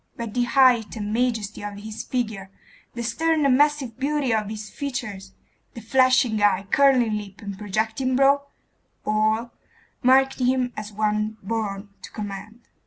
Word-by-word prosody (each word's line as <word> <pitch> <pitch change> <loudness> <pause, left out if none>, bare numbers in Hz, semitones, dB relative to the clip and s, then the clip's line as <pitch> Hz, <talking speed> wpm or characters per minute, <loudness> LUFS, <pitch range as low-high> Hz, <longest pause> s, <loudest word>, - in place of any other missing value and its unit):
But 230 -3 -5
the 245 0 +1
height 245 -4 +4
and 210 -1 -4
majesty 225 -4 -1
of 205 -1 -6
his 215 +2 -7
figure, 220 -6 -3 0.5
the 235 - -4
stern 305 +6 +1
and 265 -2 +5
massive 285 -4 +1
beauty 280 -3 0
of 215 -2 0
his 215 0 -6
features, 230 -8 -5 0.4
the - - -6
flashing 250 -2 +3
eye, 200 -1 +3
curling 250 -6 +4
lip, 195 -2 -11
and 200 -2 -6
projecting 220 +6 -1
brow 280 +1 +3 0.6
all 215 +2 +1 0.5
marked 265 +2 +4
him 250 -1 +1
as 215 0 -6
one 215 +1 -1
born 205 -1 -3
to - - -9
command. 210 +2 -7
225 Hz, 150 wpm, -24 LUFS, 210-255 Hz, 0.6 s, and